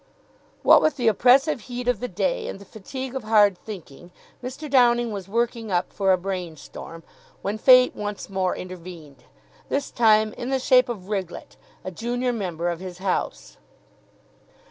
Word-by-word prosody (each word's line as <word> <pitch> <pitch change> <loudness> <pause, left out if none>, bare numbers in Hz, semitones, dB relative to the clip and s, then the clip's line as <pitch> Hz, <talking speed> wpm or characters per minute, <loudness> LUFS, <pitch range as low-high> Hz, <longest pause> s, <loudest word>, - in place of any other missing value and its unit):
What - - +7
with 310 - +2
the 245 -3 0
oppressive 255 - +4
heat 245 0 -6
of 245 -5 +1
the 250 - -3
day - - -2
and - - -6
the 200 - -14
fatigue 260 +6 -7
of 265 - -4
hard 210 -3 +4
thinking, 175 -4 -11 0.3
Mr. 260 +5 -6
Downing 240 -3 +3
was 195 -3 -6
working 230 0 -2
up 175 0 -1
for 195 -2 +2
a 185 - +4
brain 180 -3 -5
storm, 165 +3 -10 0.4
when 210 +2 -3
Fate 255 +1 +6
once 205 -1 -5
more 190 -2 -1
intervened, 175 -5 -10 0.4
this 280 0 -2
time 215 -2 +3
in 240 - -6
the 270 - +1
shape 255 -1 +4
of 195 -6 -6
Riglett, 190 -4 -5 0.3
a 185 - -5
junior 245 +5 -2
member 175 -6 -3
of 170 -1 -4
his 185 -1 -8
house. 180 - -3
215 Hz, 165 wpm, -24 LUFS, 185-245 Hz, 0.4 s, What